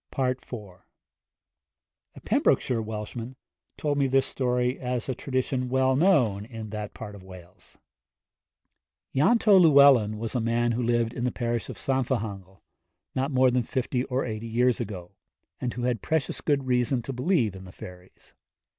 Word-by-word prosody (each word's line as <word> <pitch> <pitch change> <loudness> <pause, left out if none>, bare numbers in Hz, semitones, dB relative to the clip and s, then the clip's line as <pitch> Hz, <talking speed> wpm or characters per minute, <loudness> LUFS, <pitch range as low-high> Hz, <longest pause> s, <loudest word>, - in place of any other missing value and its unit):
IV. 130 -1 +1 1.8
A - - -12
Pembrokeshire 120 -3 +2
Welshman 110 +3 -6 0.4
told 145 -1 -1
me 140 - +3
this 135 0 +2
story 125 0 -1
as 125 -2 -3
a 130 - -1
tradition 130 0 -2
well 130 0 +2
known 130 - +3
in 110 -2 -8
that 105 -1 -6
part 105 -2 -8
of 100 - -11
Wales. 95 0 -15 1.4
Ianto 200 - +5
Llewellyn 140 -9 +6
was 115 +1 -4
a 125 - 0
man 115 +1 +1
who 120 +2 -1
lived 120 -1 +1
in 120 - -4
the 125 - +1
parish 120 -2 -3
of - - -7
Llanfihangel, 110 -8 -3 0.5
not 135 +2 -1
more 130 -2 +3
than 125 0 +2
fifty 125 +1 -2
or 130 0 -1
eighty 110 -1 -5
years 120 +2 +2
ago, 95 -6 -6 0.5
and 125 -2 -3
who 120 - -4
had 120 -4 0
precious 160 -4 -1
good 140 -3 0
reason 125 0 +1
to 135 - -5
believe 125 - +1
in 95 0 -10
the 90 - -11
fairies. 90 -1 -13
125 Hz, 155 wpm, -26 LUFS, 110-130 Hz, 1.8 s, Llewellyn